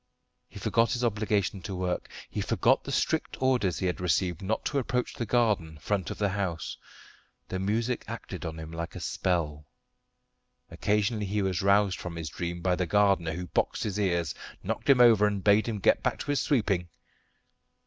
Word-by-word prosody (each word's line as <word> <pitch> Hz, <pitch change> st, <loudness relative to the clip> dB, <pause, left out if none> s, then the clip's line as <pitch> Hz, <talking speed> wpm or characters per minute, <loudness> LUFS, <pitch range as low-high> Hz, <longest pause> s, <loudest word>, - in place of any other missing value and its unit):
He -, -, -12 dB
forgot 115 Hz, 0 st, +2 dB
his 125 Hz, -1 st, -2 dB
obligation 105 Hz, -3 st, 0 dB
to 95 Hz, +2 st, -5 dB
work; 90 Hz, 0 st, -2 dB, 0.2 s
he -, -, -4 dB
forgot -, -, +2 dB
the -, -, -5 dB
strict -, -, 0 dB
orders 125 Hz, -9 st, +2 dB
he 95 Hz, -, -2 dB
had 90 Hz, 0 st, -1 dB
received 90 Hz, -1 st, +1 dB
not 105 Hz, +3 st, -2 dB
to 140 Hz, -, +1 dB
approach 125 Hz, -1 st, -1 dB
the 115 Hz, -, -4 dB
garden 105 Hz, -10 st, +1 dB
front 95 Hz, +4 st, -2 dB
of -, -, -5 dB
the 105 Hz, -1 st, +1 dB
house. 95 Hz, -5 st, -3 dB, 0.7 s
The 95 Hz, -, -2 dB
music 110 Hz, +5 st, -1 dB
acted -, -, -6 dB
on 80 Hz, -1 st, -5 dB
him 80 Hz, 0 st, -7 dB
like 85 Hz, 0 st, -5 dB
a -, -, -5 dB
spell. 75 Hz, -5 st, -1 dB, 1.0 s
Occasionally 105 Hz, 0 st, 0 dB
he 100 Hz, +1 st, 0 dB
was 95 Hz, 0 st, 0 dB
roused 100 Hz, 0 st, +3 dB
from 90 Hz, -1 st, -6 dB
his 80 Hz, -2 st, -4 dB
dream 85 Hz, +3 st, -4 dB
by 90 Hz, 0 st, +2 dB
the 90 Hz, -1 st, -1 dB
gardener, 95 Hz, -3 st, +3 dB
who 90 Hz, +2 st, -4 dB
boxed 85 Hz, -, -1 dB
his 105 Hz, -1 st, -2 dB
ears, 85 Hz, -6 st, 0 dB, 0.3 s
knocked -, -, -3 dB
him 135 Hz, -2 st, +7 dB
over, 110 Hz, -4 st, +7 dB
and 100 Hz, -2 st, -2 dB
bade 105 Hz, +2 st, +4 dB
him 115 Hz, -2 st, -2 dB
get 95 Hz, -, +3 dB
back -, -, 0 dB
to -, -, -2 dB
his 145 Hz, -, +1 dB
sweeping. 100 Hz, -, +1 dB
100 Hz, 190 wpm, -28 LUFS, 90-105 Hz, 1.0 s, him